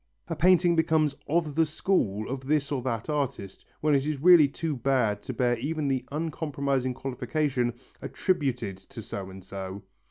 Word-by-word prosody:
A 165 Hz, -, -1 dB
painting 175 Hz, 0 st, +4 dB
becomes 160 Hz, -2 st, +2 dB
"of 160 Hz, -1 st, +1 dB
the 160 Hz, +3 st, +3 dB
school" 110 Hz, -, 0 dB
of 130 Hz, 0 st, -5 dB
this 150 Hz, -1 st, +1 dB
or 135 Hz, -3 st, -1 dB
that 115 Hz, -3 st, -3 dB
artist 140 Hz, -10 st, -3 dB, 0.2 s
when 150 Hz, -1 st, +3 dB
it 135 Hz, -1 st, +3 dB
is 150 Hz, -3 st, -2 dB
really 170 Hz, -1 st, +7 dB
too 155 Hz, +2 st, -3 dB
bad 120 Hz, -5 st, +1 dB
to 130 Hz, -, -5 dB
bear 120 Hz, 0 st, +1 dB
even 150 Hz, +3 st, -2 dB
the 130 Hz, -2 st, 0 dB
uncompromising 140 Hz, -4 st, -1 dB
qualification, 125 Hz, -1 st, -1 dB, 0.3 s
"attributed 135 Hz, -, -1 dB
to 95 Hz, +4 st, -11 dB
so 95 Hz, -1 st, -6 dB
and 95 Hz, 0 st, -11 dB
so." 95 Hz, 0 st, -7 dB
135 Hz, 165 wpm, -27 LUFS, 120-155 Hz, 0.3 s, really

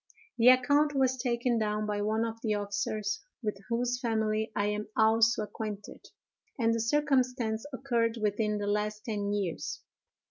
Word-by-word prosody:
The 230 Hz, -, +5 dB
account 285 Hz, +4 st, +5 dB
was 260 Hz, -1 st, +3 dB
taken 240 Hz, -1 st, 0 dB
down 210 Hz, 0 st, -1 dB
by 205 Hz, -1 st, -2 dB
one 220 Hz, +2 st, +1 dB
of 225 Hz, 0 st, -6 dB
the 215 Hz, -3 st, 0 dB
officers, 205 Hz, +1 st, -2 dB, 0.2 s
with 210 Hz, -2 st, -1 dB
whose 245 Hz, +1 st, 0 dB
family 220 Hz, -2 st, 0 dB
I 205 Hz, -, +1 dB
am 210 Hz, 0 st, -2 dB
also 225 Hz, 0 st, +4 dB
acquainted; 210 Hz, -1 st, -7 dB, 0.5 s
and 230 Hz, -3 st, +2 dB
the 230 Hz, -, 0 dB
circumstance 250 Hz, -3 st, +1 dB
occurred 235 Hz, -3 st, 0 dB
within 210 Hz, 0 st, 0 dB
the 205 Hz, -, -3 dB
last 210 Hz, +1 st, -1 dB
ten 205 Hz, -3 st, -2 dB
years. 195 Hz, -5 st, -3 dB
220 Hz, 150 wpm, -30 LUFS, 210-245 Hz, 0.5 s, The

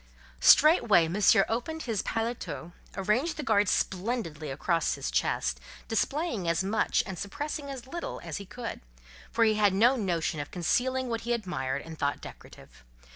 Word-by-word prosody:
Straightway 235 Hz, -, +6 dB
Monsieur 195 Hz, +2 st, +4 dB
opened 315 Hz, +8 st, -3 dB
his 225 Hz, -5 st, -1 dB
paletôt, 225 Hz, -6 st, -4 dB, 0.3 s
arranged 235 Hz, -, 0 dB
the 300 Hz, -, -4 dB
guard 205 Hz, -6 st, +3 dB
splendidly 180 Hz, -, -2 dB
across 165 Hz, +5 st, 0 dB
his -, -, -4 dB
chest, -, -, 0 dB, 0.3 s
displaying 240 Hz, -, -1 dB
as 170 Hz, +2 st, +1 dB
much 205 Hz, +3 st, +1 dB
and 190 Hz, -4 st, -6 dB
suppressing 290 Hz, +7 st, -4 dB
as 265 Hz, -3 st, -7 dB
little 340 Hz, +6 st, -5 dB
as -, -, -5 dB
he 200 Hz, -, -7 dB
could: 230 Hz, +5 st, -6 dB, 0.5 s
for 230 Hz, -, +2 dB
he 220 Hz, -1 st, +4 dB
had 205 Hz, -3 st, +3 dB
no 240 Hz, +6 st, +5 dB
notion 170 Hz, -7 st, -1 dB
of 145 Hz, -, -5 dB
concealing 255 Hz, +9 st, 0 dB
what 230 Hz, -1 st, -2 dB
he 240 Hz, +1 st, -1 dB
admired 180 Hz, -, -3 dB
and 160 Hz, -1 st, -10 dB
thought 145 Hz, 0 st, 0 dB
decorative. -, -, -13 dB
210 Hz, 160 wpm, -28 LUFS, 175-245 Hz, 0.5 s, Straightway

